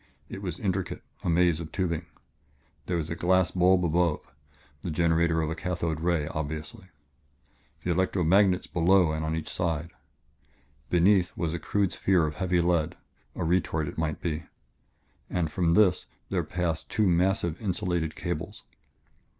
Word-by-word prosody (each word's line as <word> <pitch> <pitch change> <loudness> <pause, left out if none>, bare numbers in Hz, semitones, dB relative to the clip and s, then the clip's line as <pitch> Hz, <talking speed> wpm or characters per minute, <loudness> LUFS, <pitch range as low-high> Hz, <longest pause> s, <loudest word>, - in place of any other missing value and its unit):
It 100 - -7
was 90 -4 -4
intricate 95 -2 -2 0.2
a - - -1
maze 85 -1 +3
of 80 -2 -7
tubing. 85 -3 -2 0.8
There 90 - 0
was 80 -1 -3
a - - -1
glass 95 +1 +2
bulb 90 0 +3
above 85 -1 +1 0.6
the 90 - -4
generator 80 0 +2
of 80 - -2
a - - -2
cathode 85 -3 -2
ray, 85 -2 +1
obviously 75 +7 -5 1.0
and 90 - +1
electro 95 +1 +1
magnets 95 +2 +4
below 90 0 +3
and 80 0 -2
on 80 +1 -1
each 80 - -4
side. 85 -2 -2 1.0
Beneath 90 +1 +3
was 85 -2 -1
a 85 - -3
crude 100 +3 0
sphere 90 -4 +2
of 75 - -3
heavy 90 -2 +1
lead 85 -3 +1 0.4
a - - -3
retort, 80 -2 0
it - - -6
might 80 -2 -1
be 80 -2 -3 0.8
and 85 -4 -1
from 85 +1 +2
this 100 -4 +4 0.2
there - - 0
passed 85 -3 -2
two 105 -2 +2
massive, 90 -1 +1
insulated 90 -5 -1
cables. - - -5
85 Hz, 155 wpm, -27 LUFS, 80-90 Hz, 1.0 s, magnets